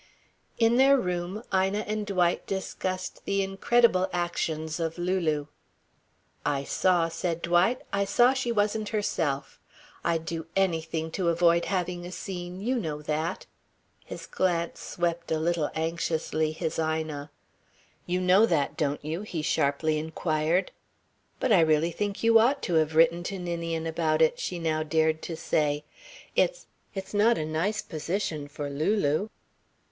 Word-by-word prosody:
In 230 +1 +4
their 275 +1 +6
room, 180 0 -3
Ina 190 +2 +2
and 210 0 -3
Dwight 180 -3 +1
discussed 185 -1 -3
the 200 0 +1
incredible 195 0 +3
actions 160 -2 -2
of 165 0 -2
Lulu. 175 -5 0 1.0
"I 140 -1 0
saw," 175 +2 +2
said 170 0 -3
Dwight, 175 +8 +2
"I 200 0 +2
saw 240 +6 +4
she 265 -3 -1
wasn't 210 0 0
herself. 155 -10 -2 0.4
I'd 165 -1 0
do 165 -1 -4
anything 165 -4 0
to 175 0 0
avoid 170 0 +3
having 180 -1 -2
a 175 - -7
scene 180 -1 -6
you 250 +5 0
know 150 -8 -3
that." 155 +2 -2 0.6
His - - -8
glance 170 -2 -1
swept 170 -1 -2
a 160 - +2
little 160 -1 0
anxiously 160 -1 -1
his 160 0 -3
Ina. 155 -2 -2 0.8
"You 180 +1 0
know 185 +5 +5
that, 150 -7 0
don't 145 -2 -1
you?" 160 +4 -3
he 175 -7 -4
sharply 150 +2 +1
inquired. 160 +2 0 0.7
"But 260 - 0
I 200 - +7
really 160 +1 +3
think 205 +4 -3
you 230 0 +7
ought 260 +5 +2
to 175 - -1
have 160 -1 +2
written 165 +1 +5
to 195 - -3
Ninian 170 -2 -3
about 160 -1 +2
it," 160 - +2
she 180 - -3
now 160 -2 0
dared 160 0 +1
to 165 - -5
say. 150 -1 0 0.5
"It's - - +1 0.3
it's 190 +1 -6
not 220 +3 +4
a 155 - -2
nice 170 +8 -1
position 160 -2 -3
for 145 0 -5
Lulu." 155 +5 +1
170 Hz, 150 wpm, -27 LUFS, 160-195 Hz, 1.0 s, I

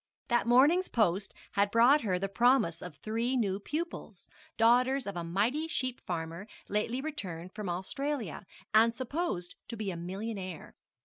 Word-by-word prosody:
That 240 -1 +2
morning's 290 +10 +5
post 195 -3 +1 0.2
had 200 0 +2
brought 240 +7 +5
her 190 -5 0
the 195 +2 -1
promise 240 -4 +3
of 180 -4 -8
three 230 - -1
new 200 -5 0
pupils, 300 - -5 0.3
daughters 250 +4 +4
of 200 - -4
a 175 - -3
mighty 220 - 0
sheep 255 -5 -2
farmer 170 +2 -4 0.2
lately 230 +5 -1
returned 185 - -6
from 210 -4 -5
Australia, 210 - -3 0.3
and 225 +2 +5
supposed 260 - -3
to 230 - -6
be 205 -2 -2
a 175 - -5
millionaire. 185 0 -5
220 Hz, 150 wpm, -31 LUFS, 185-255 Hz, 0.3 s, morning's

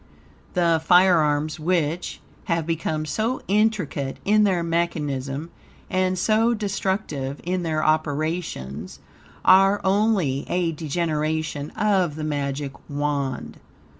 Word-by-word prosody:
The 170 -2 +3
firearms 160 -4 +4
which 165 0 -1 0.2
have 170 -2 0
become 160 -1 -2
so 225 - -2
intricate 200 -10 0
in 210 +1 +4
their 180 -4 +1
mechanism 150 -3 -2 0.4
and 185 0 +1
so 225 +5 +3
destructive 190 -9 -2
in 180 +1 -1
their 155 -2 -1
operations, 155 - -2 0.5
are 195 +2 +6
only 190 -9 +2
a 175 -2 +1
degeneration 155 -1 -2
of 190 -7 +2
the 155 - -5
Magic 140 -2 -2 0.2
Wand. 145 -3 -2
165 Hz, 105 wpm, -23 LUFS, 150-185 Hz, 0.5 s, are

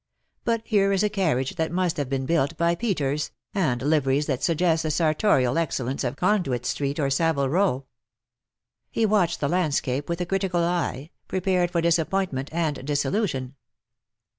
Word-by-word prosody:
But 230 -1 0
here 200 -3 +2
is 195 +1 +2
a 210 - +2
carriage 180 -7 0
that 160 -1 -1
must 180 -1 0
have 145 -3 -2
been 135 -1 -1
built 165 0 +1
by 170 0 +2
Peters, 150 - -1 0.2
and 130 -11 0
liveries 145 -1 +2
that 135 -4 -2
suggest 165 -1 +2
the 160 - -2
sartorial 155 - +2
excellence 135 -5 -2
of 125 +1 -2
Conduit 175 - 0
Street 140 +3 -2
or 140 -2 +1
Savile 140 -2 +1
Row.'''' 155 -5 +1 1.0
He 225 - +1
watched 205 -5 +1
the 145 - +1
landscape 145 -5 0
with 170 0 -2
a 180 - -1
critical 185 -1 0
eye, 170 -4 -2 0.2
prepared 185 -1 +1
for 170 -1 0
disappointment 170 -4 0
and 160 -5 -1
disillusion. 140 - -1
160 Hz, 160 wpm, -25 LUFS, 140-180 Hz, 1.0 s, here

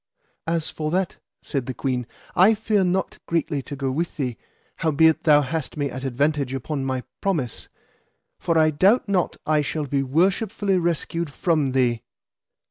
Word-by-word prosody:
As 165 -1 -1
for 155 -1 -3
that, 185 +2 -1 0.3
said 135 -5 -3
the 130 - -4
queen, 125 -2 -2 0.3
I 200 +5 +6
fear 215 -2 +1
not 185 +1 -1
greatly 165 -3 0
to 145 - -7
go 135 -1 -2
with 165 +5 -2
thee, 125 -5 -2 0.4
howbeit 160 0 +3
thou 150 -2 +6
hast 155 +2 -4
me 140 -2 -1
at 130 +1 -6
advantage 140 +1 0
upon 135 +2 -3
my 130 -1 -2 0.2
promise, 155 - -1 0.7
for 165 -1 +1
I 155 0 +5
doubt 195 - +3
not 190 -3 0
I 155 -1 +3
shall 150 +1 -2
be 140 0 0
worshipfully 190 - +1
rescued 170 -1 -1
from 150 -3 +1
thee. 120 -3 +2
155 Hz, 160 wpm, -23 LUFS, 135-175 Hz, 0.7 s, I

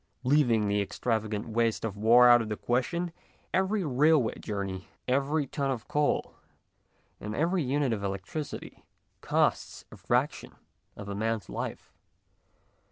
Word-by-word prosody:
Leaving 125 -6 +3
the 100 0 +1
extravagant 110 0 -2
waste 115 0 0
of 105 -3 -4
war 115 +4 +6
out 120 0 +7
of 110 - -5
the 105 - -3
question, 170 +8 -1 0.4
every 190 +2 +1
rail 150 +2 +4
way 115 -4 -1
journey, 95 -3 -4 0.2
every, 140 +3 +1
ton 135 +1 -2
of 125 -4 -3
coal, 150 0 0 0.9
and 105 +1 -5
every 175 +4 +1
unit 135 -2 0
of 100 -2 -4
electricity 100 +10 -5 0.4
costs - - 0
a - - -11
fraction - - -1 0.4
of 100 - -8
a 100 - -4
man's 110 -1 -2
life. - - -6
120 Hz, 140 wpm, -29 LUFS, 105-145 Hz, 0.9 s, out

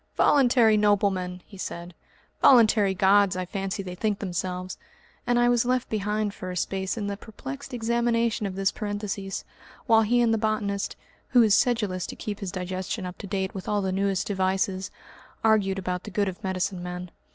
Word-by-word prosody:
"Voluntary 245 -6 +5
noblemen!" 195 -3 +1
he 195 - -14
said, 170 -1 -6 0.5
"voluntary 215 -6 +5
Gods 195 0 +4
I 185 - -2
fancy 195 +1 -3
they 180 -1 -6
think 205 +2 -1
themselves," 185 -1 -4 0.5
and 245 0 +3
I 240 0 +4
was 240 -1 +3
left 250 0 0
behind 210 -1 -1
for 185 - -7
a 180 - -4
space 190 +4 -2
in 210 - -2
the 200 0 -2
perplexed 200 - -8
examination 235 -2 0
of 190 - -6
this 195 0 +1
parenthesis, 205 -2 -4 0.4
while 225 -3 +5
he 235 +3 +2
and 235 -2 +3
the 225 - +1
botanist 210 -2 -1 0.3
who 245 -2 +5
is 215 -2 +4
sedulous 210 -7 +1
to - - -7
keep 205 -1 -5
his 195 -3 -4
digestion 185 +2 -4
up 180 0 -7
to 200 - -7
date 190 -1 -2
with 190 - -7
all 205 -1 +1
the 190 - -1
newest 195 0 0
devices 190 -1 -1 0.5
argued 210 -3 +3
about 180 -1 -3
the - - -7
good 205 0 0
of 185 -1 -6
medicine 190 0 -2
men. 180 0 -6
200 Hz, 185 wpm, -26 LUFS, 185-220 Hz, 0.5 s, Voluntary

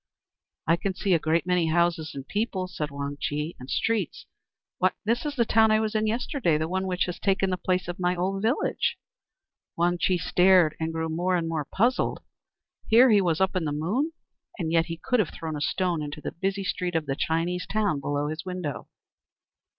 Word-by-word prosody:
"I 165 +1 +3
can 190 +1 -2
see 195 -1 +1
a 170 - +4
great 160 +2 +1
many 180 -2 +2
houses 165 -2 +1
and 135 -1 -7
people," 205 -3 -1
said 155 -5 -4
Wang 140 0 -5
Chih, 150 +3 -2
"and 125 +1 -10
streets 220 -8 -1 0.5
why, 185 0 +3
this 240 +6 0
is 290 - -4
the 235 -3 +2
town 220 0 +4
I 215 0 +4
was 220 0 -1
in 215 0 +1
yesterday, 225 - 0
the 155 +1 -1
one 190 +2 -1
which 180 -1 0
has 180 - -5
taken 195 -1 +1
the - - +1
place 185 0 -1
of 175 0 -5
my 180 0 +1
old 190 +2 -1
village." 230 +7 0 0.8
Wang 175 +1 +1
Chih 185 0 +2
stared, 180 -2 +4
and 160 0 -1
grew 160 0 -2
more 175 +3 0
and 170 -2 0
more 160 -3 -2
puzzled. 240 - +1 0.7
Here 240 +3 +7
he 205 -2 +5
was 170 -4 +1
up 190 0 +1
in 180 -3 0
the 150 - -1
Moon, 200 - -1 0.5
and 165 -5 -2
yet 165 0 +3
he 165 -1 -5
could 250 +8 0
have 200 - +2
thrown 160 -1 -5
a 145 - -5
stone 175 +1 0
into 145 0 -5
the - - -5
busy 195 +3 -2
street 180 -1 -2
of 160 -2 +1
the 135 -1 -2
Chinese 170 +4 -1
town 205 -8 0
below 145 +1 -1
his 155 +2 -4
window. 180 -5 -5
180 Hz, 210 wpm, -26 LUFS, 160-195 Hz, 0.8 s, Here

